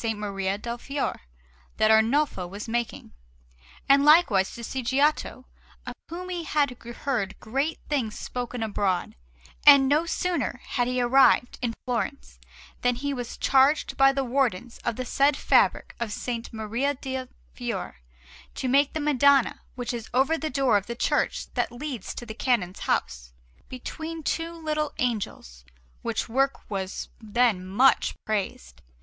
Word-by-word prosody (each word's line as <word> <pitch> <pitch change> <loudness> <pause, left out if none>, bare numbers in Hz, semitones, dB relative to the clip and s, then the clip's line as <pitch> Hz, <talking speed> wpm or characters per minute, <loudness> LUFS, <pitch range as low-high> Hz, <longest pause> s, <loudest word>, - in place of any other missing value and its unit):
Maria 195 -2 -2
del 235 +3 -5
Fiore 275 +3 -3 0.6
that 220 0 +4
Arnolfo 220 -3 +2
was 200 +5 -7
making, 235 0 -3 0.7
and 275 0 +6
likewise 295 - +5
to 235 - -8
see 260 +3 -3
Giotto, 260 -1 0 0.4
of - - -5 0.2
whom 360 +2 -6
he 350 -2 -3
had 295 -3 +1
heard 235 -3 -3
great 275 +8 -2
things 250 -8 -1
spoken 245 -1 -4
abroad; 200 -4 -1 0.5
and 280 -2 +8
no 300 +4 +2
sooner 335 -8 -1
had 245 -2 0
he 250 0 -1
arrived 245 0 +4
in 235 -2 -2
Florence 250 +3 -3 0.4
than 245 0 +2
he 280 +3 -3
was 245 -3 -5
charged 275 +3 +3
by 270 0 +6
the 275 0 -1
Wardens 245 -3 -1
of 235 - -1
the 255 - -4
said 275 +3 +2
fabric - - +2
of 235 - -1
S. 235 +2 -4
Maria 230 +6 -1
del 260 -1 -5 0.3
Fiore - - -4 0.6
to 260 - -3
make 275 +2 +3
the 315 - -2
Madonna 280 -2 +3
which 245 -1 -4
is 235 -2 -6
over 270 +5 +3
that 315 -3 -4
door 265 -6 +4
of 200 - -4
the 235 - -4
church - - -1
that - - -1
leads 245 -4 -6
to 240 - -7
the 220 - -7
Canon's 215 -7 0
house, - - -2 0.4
between 315 +5 -6
two 330 +3 -1
little 305 -2 -2
angels; 200 - -3 0.4
which - - -2
work 270 +4 0
was 190 -1 -4
then 220 -3 +1
much 205 +9 +3
praised. 185 - -3
250 Hz, 150 wpm, -26 LUFS, 220-280 Hz, 0.7 s, and